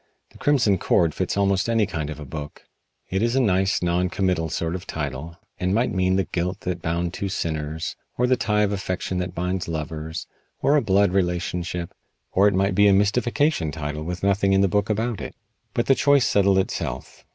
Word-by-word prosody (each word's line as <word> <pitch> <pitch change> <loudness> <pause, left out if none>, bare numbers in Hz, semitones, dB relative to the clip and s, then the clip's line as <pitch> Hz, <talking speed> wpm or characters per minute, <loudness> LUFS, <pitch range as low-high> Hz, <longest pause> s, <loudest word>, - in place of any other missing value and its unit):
"The - - -17
Crimson 120 -10 +3
Cord" 85 -3 +2
fits - - -2
almost 100 +1 +2
any 115 -2 +3
kind 80 -5 -4
of 75 -1 -6
a 75 - -7
book. 75 +1 -8 0.5
It 95 +1 0
is 115 +2 +1
a - - +4
nice, 95 -5 +2
non 90 +1 +1
committal 90 -4 0
sort 85 +2 -2
of 90 -1 -6
title, 80 +6 -5 0.2
and 90 +2 0
might 120 +3 +1
mean 95 0 +1
the 95 - +2
guilt 90 +2 -3
that 90 -1 -3
bound 85 +1 -1
two 100 - -3
sinners, 80 -3 -3 0.2
or 125 - +3
the 130 +1 +3
tie 105 -2 +1
of 105 - +1
affection 95 -2 -2
that 90 0 -4
binds 90 +1 -2
lovers, 80 0 -4 0.3
or 145 - +3
a 150 - +4
blood 100 -3 +3
relationship, 90 -1 -1 0.4
or 100 +2 +4
it 100 - +2
might 95 +1 +2
be 100 +2 +5
a 100 - +6
mystification 115 - +1
title 75 0 -4
with 90 +2 -5
nothing 100 0 +2
in 95 - +4
the 100 - +4
book 105 +3 0
about 110 +1 -1
it. - - -7 0.4
But 120 - +1
the 135 - +5
choice 140 -1 +4
settled 100 -1 +3
itself. 65 -9 -3
95 Hz, 205 wpm, -24 LUFS, 85-100 Hz, 0.5 s, a